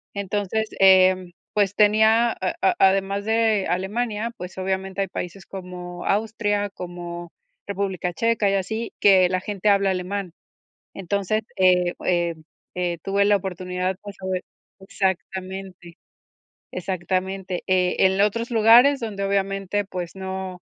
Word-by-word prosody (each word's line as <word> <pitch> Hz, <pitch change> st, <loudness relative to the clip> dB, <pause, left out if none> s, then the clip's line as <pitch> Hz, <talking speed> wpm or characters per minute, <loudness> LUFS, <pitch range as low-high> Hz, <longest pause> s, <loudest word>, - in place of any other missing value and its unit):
entonces, 205 Hz, +2 st, -2 dB
em, 185 Hz, -1 st, +5 dB, 0.2 s
pues 205 Hz, -1 st, +1 dB
tenía, 220 Hz, +3 st, +4 dB
a 185 Hz, -4 st, -3 dB
a 190 Hz, -, +2 dB
además 195 Hz, +1 st, +3 dB
de 220 Hz, -2 st, +2 dB
Alemania, 210 Hz, +4 st, -2 dB
pues, 180 Hz, -3 st, -9 dB
obviamente 190 Hz, +1 st, -2 dB
hay 195 Hz, -, 0 dB
países 180 Hz, +1 st, -6 dB
como 180 Hz, -2 st, -8 dB
Austria, 205 Hz, -1 st, 0 dB
como 175 Hz, -2 st, -7 dB, 0.4 s
República 190 Hz, -3 st, -2 dB
Checa 230 Hz, +2 st, +1 dB
y 195 Hz, -, +1 dB
así, 220 Hz, +4 st, -3 dB
que 190 Hz, -3 st, +6 dB
la 185 Hz, 0 st, -1 dB
gente 205 Hz, +1 st, -1 dB
habla 200 Hz, -1 st, +3 dB
alemán. 185 Hz, 0 st, -3 dB, 0.6 s
Entonces, 200 Hz, +3 st, -1 dB
eh, 180 Hz, -1 st, +3 dB
em, 170 Hz, -3 st, 0 dB, 0.3 s
eh, 175 Hz, -1 st, -1 dB
tuve 200 Hz, +1 st, +1 dB
la 205 Hz, 0 st, +4 dB
oportunidad, 185 Hz, 0 st, -3 dB
pues, 205 Hz, -1 st, -9 dB
sobre 185 Hz, -1 st, -2 dB, 0.4 s
exactamente, 190 Hz, -2 st, -4 dB, 0.7 s
exactamente. 185 Hz, +1 st, -3 dB
Eh, 185 Hz, -1 st, +2 dB
en 190 Hz, 0 st, +4 dB
lo 200 Hz, -, +5 dB
otros 230 Hz, +3 st, -2 dB
lugares 240 Hz, +5 st, +6 dB
donde, 210 Hz, -4 st, -4 dB
obviamente, 195 Hz, 0 st, -1 dB
pues, 180 Hz, -3 st, -6 dB
no 190 Hz, -1 st, -5 dB
190 Hz, 130 wpm, -23 LUFS, 185-205 Hz, 0.7 s, que